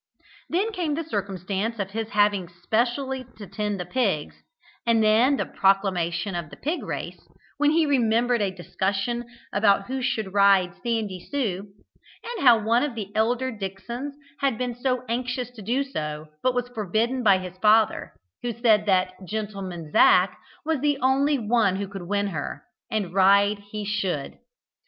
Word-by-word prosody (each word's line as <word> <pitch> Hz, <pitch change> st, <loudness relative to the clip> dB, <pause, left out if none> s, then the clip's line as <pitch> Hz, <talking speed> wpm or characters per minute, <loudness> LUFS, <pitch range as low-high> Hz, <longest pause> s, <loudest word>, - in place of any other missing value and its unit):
Then 395 Hz, +6 st, 0 dB
came 345 Hz, -8 st, -1 dB
the 330 Hz, -, -2 dB
circumstance 200 Hz, -, -3 dB
of 195 Hz, -2 st, -3 dB
his 225 Hz, +1 st, -3 dB
having 205 Hz, -3 st, +2 dB
specially 240 Hz, +9 st, -1 dB
to 210 Hz, -, -8 dB
tend 205 Hz, +1 st, -3 dB
the 180 Hz, -, -3 dB
pigs, 185 Hz, -7 st, 0 dB, 0.5 s
and 230 Hz, -1 st, +3 dB
then 230 Hz, +6 st, +4 dB
the -, -, -1 dB
proclamation 190 Hz, -2 st, +1 dB
of 170 Hz, -3 st, -4 dB
the -, -, -12 dB
pig 315 Hz, +5 st, -2 dB
race, -, -, -5 dB, 0.4 s
when 295 Hz, 0 st, +4 dB
he 320 Hz, +1 st, +3 dB
remembered 240 Hz, -3 st, +2 dB
a 200 Hz, -, +1 dB
discussion 195 Hz, +6 st, -2 dB, 0.3 s
about 200 Hz, -1 st, +3 dB
who 260 Hz, +3 st, -3 dB
should 220 Hz, -5 st, -2 dB
ride 195 Hz, -3 st, +4 dB
"Sandy 220 Hz, -6 st, -2 dB
Sue," 210 Hz, -9 st, -2 dB, 0.6 s
and 475 Hz, -7 st, -5 dB
how 235 Hz, -2 st, +9 dB
one 225 Hz, +3 st, +2 dB
of 290 Hz, -5 st, -2 dB
the 205 Hz, -3 st, -5 dB
elder 245 Hz, +4 st, +1 dB
Dicksons 220 Hz, +7 st, -6 dB, 0.3 s
had 275 Hz, -5 st, +1 dB
been 245 Hz, 0 st, -2 dB, 0.3 s
anxious 245 Hz, +1 st, -2 dB
to 240 Hz, -3 st, -12 dB
do 245 Hz, +7 st, 0 dB
so, 155 Hz, -, -5 dB
but 255 Hz, -1 st, +1 dB
was 245 Hz, 0 st, 0 dB
forbidden 225 Hz, +3 st, -1 dB
by 200 Hz, -5 st, +5 dB
his 185 Hz, -1 st, -7 dB
father, 215 Hz, +1 st, +3 dB, 0.3 s
who 240 Hz, -1 st, -2 dB
said 220 Hz, -2 st, +3 dB
that 185 Hz, -1 st, +2 dB
"gentleman 190 Hz, -5 st, -5 dB
Zac" 180 Hz, +3 st, +5 dB, 0.3 s
was 320 Hz, -2 st, 0 dB
the 290 Hz, +1 st, +1 dB
only 275 Hz, +2 st, +2 dB
one 220 Hz, -4 st, +2 dB
who 200 Hz, +1 st, -3 dB
could 190 Hz, -3 st, -8 dB
win 205 Hz, 0 st, 0 dB
on -, -, -7 dB
her, 145 Hz, -1 st, -5 dB, 0.3 s
and 200 Hz, -5 st, -2 dB
ride 200 Hz, +2 st, +4 dB
he 210 Hz, -1 st, -4 dB
should. 195 Hz, -8 st, -2 dB
215 Hz, 165 wpm, -25 LUFS, 195-245 Hz, 0.6 s, how